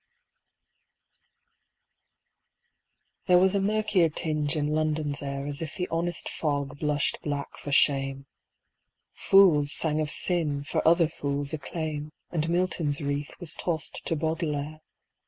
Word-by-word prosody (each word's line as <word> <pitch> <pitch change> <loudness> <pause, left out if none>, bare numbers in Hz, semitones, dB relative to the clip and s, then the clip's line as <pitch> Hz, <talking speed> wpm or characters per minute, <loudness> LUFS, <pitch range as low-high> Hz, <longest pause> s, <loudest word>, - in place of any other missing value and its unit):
There 180 -1 +6
was 190 +1 +4
a 200 - +1
murkier 210 -4 +2
tinge 155 -1 -1
in 150 -1 0
London's 155 -2 -1
air 140 0 -4
As 145 +1 -5
if 160 - -5
the 180 -1 -2
honest 170 +1 -1
fog 145 -2 -2
blushed 150 -1 0
black 145 -1 -4
for 145 - -7
shame. 135 -1 +2 0.9
Fools 165 -8 +5
sang 155 -1 +1
of 150 - -2
sin, 155 -5 +1
for 145 - -1
other 170 0 +5
fools' 145 -2 -3
acclaim, 155 0 -4 0.2
And 165 -1 -1
Milton's 170 -4 0
wreath 145 -1 -3
was 175 -4 -4
tossed 165 -3 -3
to 165 - 0
Baudelaire. 155 -1 -2
155 Hz, 125 wpm, -27 LUFS, 145-170 Hz, 0.9 s, There